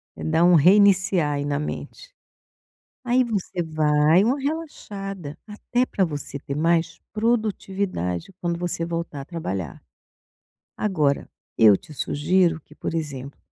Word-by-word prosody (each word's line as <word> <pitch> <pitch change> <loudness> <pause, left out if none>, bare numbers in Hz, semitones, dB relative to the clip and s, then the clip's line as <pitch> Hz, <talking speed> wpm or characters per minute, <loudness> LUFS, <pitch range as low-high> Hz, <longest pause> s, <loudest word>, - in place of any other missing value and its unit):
É - - -8
dar 160 +2 +2
um 175 0 +6
reiniciar 190 -2 +5
aí 145 0 -2
na 145 -1 -1
mente. - - -6 0.9
Aí 250 +1 +3
você 200 -6 -2
vai 155 +3 +3
uma 260 +5 +1
relaxada, 195 - -5
até 240 +4 -1
para 190 -7 0
você 145 -2 -5
ter 140 0 -5
mais 165 +1 +1
produtividade 200 - -1
quando 170 -1 -1
você 175 -1 -3
voltar 165 -4 -4
a - - -6
trabalhar. 95 - -5 0.9
Agora, 155 -9 0 0.3
eu 105 -3 +7
te 150 - -14
sugiro 165 +3 +1
que 150 - -19
por - - -4
exemplo, 140 -4 -5
170 Hz, 135 wpm, -24 LUFS, 150-200 Hz, 0.9 s, eu